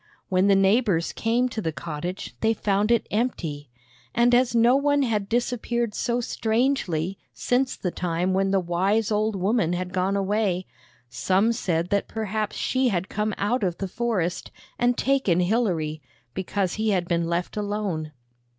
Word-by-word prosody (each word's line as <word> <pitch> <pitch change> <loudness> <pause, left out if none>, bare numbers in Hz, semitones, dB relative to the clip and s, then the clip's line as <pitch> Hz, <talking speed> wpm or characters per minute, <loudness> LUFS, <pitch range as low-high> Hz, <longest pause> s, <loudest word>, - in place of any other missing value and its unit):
When 185 +1 +3
the 200 - +5
neighbors 195 -3 +2
came 235 +3 +1
to 225 - -4
the 160 - -1
cottage 160 +4 -5
they 225 0 +2
found 205 +1 +1
it 235 -1 +3
empty; 165 - -2 0.5
and 240 +1 +4
as 245 -1 +3
no 235 +2 +5
one 285 0 +2
had 210 -5 -1
disappeared 240 -1 -1
so 240 +2 -1
strangely 220 - 0 0.2
since 255 +1 0
the 180 - -3
time 180 +1 -1
when 195 +1 +2
the 195 0 +3
wise 190 +5 0
old 215 0 +1
woman 190 -2 +1
had 180 +1 -3
gone 190 +1 +1
away, 195 -2 0 0.4
some 190 - +1
said 175 -6 -1
that 200 -1 0
perhaps 215 -1 -3
she 260 0 +1
had 185 -4 -1
come 215 0 -1
out 235 +6 0
of 180 -3 -1
the 195 - -3
forest 190 -5 -2 0.3
and 245 0 +2
taken 265 -10 +2
Hilary, 175 -6 0 0.3
because 190 +2 -1
he 220 0 0
had 180 -4 +1
been 170 -1 0
left 170 +1 -2
alone. 205 -7 -2
200 Hz, 160 wpm, -25 LUFS, 180-230 Hz, 0.5 s, the